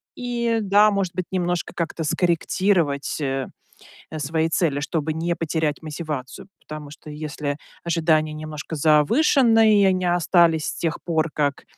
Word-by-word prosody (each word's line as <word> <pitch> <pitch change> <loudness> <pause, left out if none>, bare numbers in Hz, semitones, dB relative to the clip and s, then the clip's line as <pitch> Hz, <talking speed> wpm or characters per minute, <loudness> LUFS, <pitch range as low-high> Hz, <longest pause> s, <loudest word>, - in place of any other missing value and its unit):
И, 235 -2 -1
да, 205 +1 +5
может 195 -3 -1
быть, 185 - -3
немножко 175 -1 -2
как-то 165 -1 -3
скорректировать, 170 -2 0
э, 135 -1 -2 0.6
э, 155 - -5
свои 160 +2 0
цели, 150 -4 0
чтобы 155 0 -2
не 170 +2 -1
потерять 160 -2 -2
мотивацию. 150 -3 -6
Потому 150 -1 -9
что 150 +1 -12
если 150 -1 -4 0.3
ожидания 160 -2 +1
немножко 155 +1 -6
завышенные 220 - +4
и - - +5
они 185 -1 +2
остались 170 -2 +3
с - - -3
тех 165 -2 -2
пор, 160 -2 0
как 145 -2 -1
160 Hz, 145 wpm, -22 LUFS, 150-185 Hz, 0.6 s, да